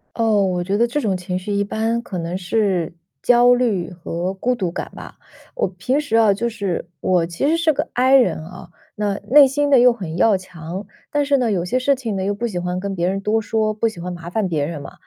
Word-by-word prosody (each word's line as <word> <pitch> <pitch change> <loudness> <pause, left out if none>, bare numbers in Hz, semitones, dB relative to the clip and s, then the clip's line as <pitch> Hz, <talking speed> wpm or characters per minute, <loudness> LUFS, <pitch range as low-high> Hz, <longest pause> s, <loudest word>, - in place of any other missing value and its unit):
哦， 220 -4 +2
我 180 -1 -1
觉 195 +3 -1
得 235 +1 +3
这 295 +5 -2
种 200 -5 0
情 180 0 -4
绪 185 +3 -5
一 200 0 +1
般 225 +3 -1
可 190 -6 -6
能 170 +2 -3
是 185 -3 0 0.3
焦 245 0 +5
虑 220 -9 0
和 175 +1 -4
孤 250 +6 0
独 185 -7 -2
感 - - -5
吧。 - - -10 0.4
我 - - 0
平 195 +10 -1
时 290 -7 -2
啊， 220 -3 +5
就 235 +4 -2
是 200 -6 -3
我 180 -3 +2
其 170 +10 -3
实 330 - +2
是 330 -2 +2
个 295 +4 -1
I 260 +2 +4
人 245 -11 +3
啊， 180 0 -11 0.3
那 205 -1 -1
内 285 +1 +8
心 290 +2 0
的 275 - +6
又 250 0 +7
很 185 -8 -6
要 200 +2 +4
强， 180 +2 -8 0.2
但 290 -1 +1
是 280 0 +2
呢， 240 -4 +1
有 180 -3 0
些 250 +8 0
事 275 +2 +2
情 230 -6 -4
呢 190 - -2
又 200 +1 0
不 235 +4 -3
喜 185 -5 -5
欢 180 +1 -2
跟 195 0 -4
别 175 +1 0
人 195 +1 -1
多 215 +2 0
说， 215 0 0
不 225 +2 0
喜 190 -6 -11
欢 180 +1 -5
麻 170 0 -8
烦 205 +1 -1
别 150 -4 -1
人 155 -2 -5
嘛。 - - -10
200 Hz, 265 characters per minute, -20 LUFS, 180-240 Hz, 0.4 s, 内